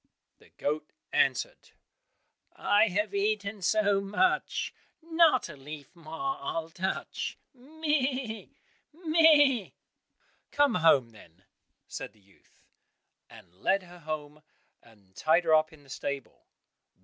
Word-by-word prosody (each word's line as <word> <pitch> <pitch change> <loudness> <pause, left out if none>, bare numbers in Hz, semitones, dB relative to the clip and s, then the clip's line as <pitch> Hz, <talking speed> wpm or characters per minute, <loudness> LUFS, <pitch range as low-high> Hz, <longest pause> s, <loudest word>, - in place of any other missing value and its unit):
The - - -21
goat 150 +1 -3 0.2
answered, - - 0 0.8
"I 210 +2 +3
have 205 +1 -1
eaten 200 0 -1
so 205 +1 +2
much, 210 - 0 0.3
Not 325 -5 +3
a 160 - -10
leaf 145 +4 -10
more 170 - -4
I'll 165 0 -4
touch, 190 +2 -3 0.2
meh! 270 -4 -2 0.4
meh!" 310 - +4 0.8
"Come 290 -4 +3
home, 160 - +4
then," 90 -4 -18 0.4
said - - -7
the 110 - -26
youth, 100 -1 -28 0.7
and 85 - -16
led 195 0 +2
her 175 0 -14
home, 150 -1 -6 0.4
and 100 -4 -23
tied 165 +3 +3
her 160 -1 +2
up 155 +1 +4
in 155 -2 -17
the - - -21
stable. 140 0 -6
190 Hz, 115 wpm, -29 LUFS, -, 0.8 s, meh